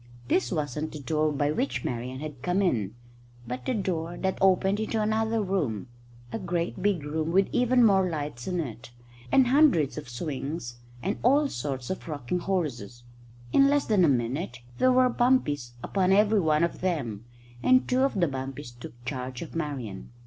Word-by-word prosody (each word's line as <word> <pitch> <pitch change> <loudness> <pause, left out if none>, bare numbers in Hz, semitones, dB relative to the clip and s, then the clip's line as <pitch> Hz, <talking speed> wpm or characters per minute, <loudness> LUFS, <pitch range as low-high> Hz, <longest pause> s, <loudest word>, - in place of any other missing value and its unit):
This 190 - +2
wasn't 150 -2 -2
the 155 - -6
door 155 +1 0
by 145 0 0
which 135 -4 -2
Marian 125 +2 -4
had 150 -4 -7
come 180 +6 +1
in, 115 - 0 0.5
but 125 +1 -4
a 255 - +1
door 175 -4 -2
that 190 -1 -2
opened 190 +1 +3
into 220 +1 -1
another 220 +1 +1
room 145 - -2 0.4
a - - -3
great 175 -1 -2
big 195 -6 +1
room 155 +2 -2
with 195 +2 +4
even 250 0 +4
more 190 -3 +4
lights 145 -7 -5
in 180 -1 -1
it, 120 -7 -5 0.4
and 265 - +6
hundreds 245 - +4
of 145 - -11
swings 135 -1 -5 0.2
and 195 +4 -1
all 285 +5 +4
sorts 130 +1 -4
of 185 - -5
rocking 150 +2 -2
horses. 130 - -3 0.5
In 275 - +6
less 285 0 +2
than 210 -4 +3
a 165 - +5
minute 125 +1 -1 0.2
there 255 - +5
were 255 0 +5
bumpies 240 - +1
upon 190 -1 +1
every 210 +2 +4
one 155 -2 +2
of 170 - -1
them, 125 - -2 0.4
and 255 0 +4
two 255 +1 +2
of 270 -7 +1
the 170 - +3
bumpies 135 -1 -5
took 120 0 -12
charge 130 0 -4
of 165 - -10
Marian. 135 -11 -4
160 Hz, 180 wpm, -27 LUFS, 130-195 Hz, 0.5 s, and